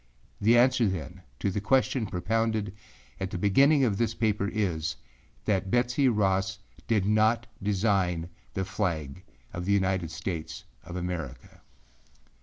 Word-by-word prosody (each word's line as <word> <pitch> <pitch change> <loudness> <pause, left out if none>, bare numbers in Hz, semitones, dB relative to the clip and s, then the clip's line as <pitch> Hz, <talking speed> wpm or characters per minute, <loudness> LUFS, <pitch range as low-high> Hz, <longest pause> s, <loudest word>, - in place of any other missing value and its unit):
The 115 +3 +5
answer, 125 -1 +4
then, 90 -8 -4 0.2
to 100 - -1
the 100 - -2
question 130 0 +2
propounded 105 +2 -1 0.5
at 95 -1 -2
the 95 - -4
beginning 135 - +4
of 105 -6 +1
this 115 -1 0
paper 105 -3 0
is, 90 -8 -1 0.5
that 95 -2 0
Betsey 125 +3 +2
Ross 95 -4 +1 0.3
did 105 -4 +2
not 110 +2 +3 0.2
design 95 -4 +1 0.3
the 95 - -1
flag 85 -6 -2 0.3
of 85 0 -4
the 100 - +2
United 95 -4 +1
States 85 -1 -5 0.2
of 85 +2 -8
America. 85 -7 -5
100 Hz, 135 wpm, -28 LUFS, 90-115 Hz, 0.5 s, The